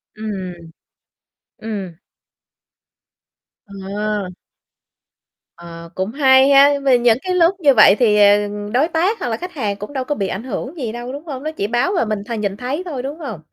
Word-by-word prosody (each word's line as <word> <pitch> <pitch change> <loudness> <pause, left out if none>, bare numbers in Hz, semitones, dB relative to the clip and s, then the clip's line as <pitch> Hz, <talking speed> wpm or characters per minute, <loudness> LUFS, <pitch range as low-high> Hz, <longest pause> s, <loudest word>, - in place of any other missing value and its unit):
Ừm. 200 -4 -5 1.1
Ừm. 200 -5 -6 1.7
Ờ. 200 0 -4 1.3
Ờ, 170 -1 -11
cũng 190 +3 -3
hay 265 0 +5
ha. 280 0 +7 0.2
Vì 260 -2 +5
những 240 -2 +3
cái 370 - -2
lúc 350 +1 +3
như 290 -5 +4
vậy 215 -4 +7
thì, 215 -4 +3
ờ, 205 0 +6 0.4
đối 270 +6 +3
tác 355 +7 0
hoặc 355 - -3
là 225 - -2
khách 360 +5 -8
hàng 215 -10 -2
cũng 210 +7 -9
đâu 265 -2 -2
có 295 +3 -3
bị 195 -6 -2
ảnh 190 +3 -5
hưởng 260 +4 -6
gì 245 -7 -4
đâu, 240 +2 -7
đúng 290 +3 -8
hông? 275 -4 -7
Nó 310 - -3
chỉ 205 -10 -3
báo 240 - 0
và 345 - +1
mình 215 -2 -3
th 235 - -11
nhìn 200 -1 -3
thấy 260 +8 -3
thôi, 280 -8 -5
đúng 285 +5 -6
hông? 265 - -6
240 Hz, 185 wpm, -19 LUFS, 205-285 Hz, 1.7 s, ha